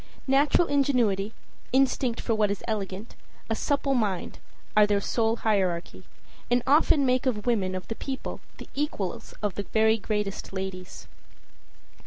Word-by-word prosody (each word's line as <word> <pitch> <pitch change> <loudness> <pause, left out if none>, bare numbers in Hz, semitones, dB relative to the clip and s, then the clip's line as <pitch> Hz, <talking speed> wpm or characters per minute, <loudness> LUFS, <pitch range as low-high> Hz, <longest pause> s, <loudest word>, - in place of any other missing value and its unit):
Natural 280 +5 +4
ingenuity, 240 -8 +2 0.4
instinct 260 -2 +2
for 230 - 0
what 215 -2 +2
is 200 -1 -3
elegant, 205 -1 -4 0.4
a - - +2
supple 280 +2 0
mind 205 -8 -1 0.4
are 210 0 +6
their 205 -1 +2
sole 225 +2 +1
hierarchy, 180 - -1 0.4
and 245 0 +2
often 285 0 +4
make 255 +1 +2
of 210 -5 -1
women 200 -6 +1
of 185 - -5
the - - -3
people 265 +3 -5 0.2
the - - -10
equals 275 -10 -3
of 205 -2 0
the 200 - -3
very 220 0 +4
greatest 210 -2 -3
ladies. 190 -1 -6
220 Hz, 145 wpm, -27 LUFS, 195-260 Hz, 0.4 s, are